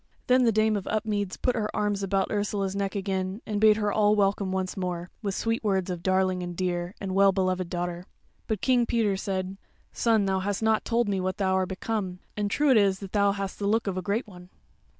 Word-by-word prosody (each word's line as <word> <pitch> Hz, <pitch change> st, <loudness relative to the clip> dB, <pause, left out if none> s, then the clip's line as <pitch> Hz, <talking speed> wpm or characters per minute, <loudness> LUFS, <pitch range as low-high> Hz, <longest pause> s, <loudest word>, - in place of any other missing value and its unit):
Then 255 Hz, 0 st, +4 dB
the 230 Hz, -, +4 dB
Dame 215 Hz, 0 st, +2 dB
of 200 Hz, -, -4 dB
Upmeads 210 Hz, -3 st, -1 dB
put 250 Hz, -, 0 dB
her 215 Hz, -2 st, -1 dB
arms 205 Hz, -1 st, 0 dB
about 195 Hz, 0 st, 0 dB
Ursula's 205 Hz, -2 st, -1 dB
neck 200 Hz, -1 st, -2 dB
again, 190 Hz, 0 st, -2 dB
and 210 Hz, -1 st, -2 dB
bade 215 Hz, -1 st, +6 dB
her 210 Hz, -1 st, 0 dB
all 210 Hz, 0 st, +4 dB
welcome 200 Hz, -1 st, +1 dB
once 190 Hz, -1 st, -2 dB
more, 180 Hz, -2 st, -4 dB
with 200 Hz, -3 st, -2 dB
sweet 225 Hz, 0 st, -1 dB
words 190 Hz, -3 st, 0 dB
of 175 Hz, -2 st, -5 dB
darling 185 Hz, 0 st, +1 dB
and 175 Hz, -1 st, -6 dB
dear, 175 Hz, 0 st, -2 dB
and 190 Hz, -2 st, -4 dB
well 195 Hz, 0 st, +5 dB
beloved 185 Hz, -2 st, -1 dB
daughter. 175 Hz, 0 st, -3 dB, 0.4 s
But 215 Hz, -3 st, -2 dB
King 245 Hz, -3 st, +3 dB
Peter 220 Hz, -4 st, +1 dB
said: 190 Hz, 0 st, -3 dB, 0.4 s
"Son, 225 Hz, -3 st, +2 dB
thou 190 Hz, -1 st, +1 dB
hast 200 Hz, +2 st, -2 dB
not 220 Hz, -1 st, +2 dB
told 235 Hz, -1 st, +1 dB
me 195 Hz, -2 st, 0 dB
what 185 Hz, 0 st, -2 dB
thou 190 Hz, -2 st, +1 dB
are 190 Hz, -1 st, +1 dB
become; 190 Hz, -1 st, -3 dB, 0.2 s
and 205 Hz, -1 st, -1 dB
true 290 Hz, +6 st, +2 dB
it 250 Hz, -, +6 dB
is 200 Hz, -2 st, +3 dB
that 195 Hz, -1 st, -9 dB
thou 200 Hz, -1 st, +3 dB
hast 195 Hz, -1 st, -5 dB
the 200 Hz, -, -1 dB
look 225 Hz, +2 st, +2 dB
of 195 Hz, -3 st, -2 dB
a 185 Hz, -, -2 dB
great 205 Hz, +6 st, -1 dB
one." 180 Hz, -4 st, -13 dB
195 Hz, 230 wpm, -27 LUFS, 185-210 Hz, 0.4 s, bade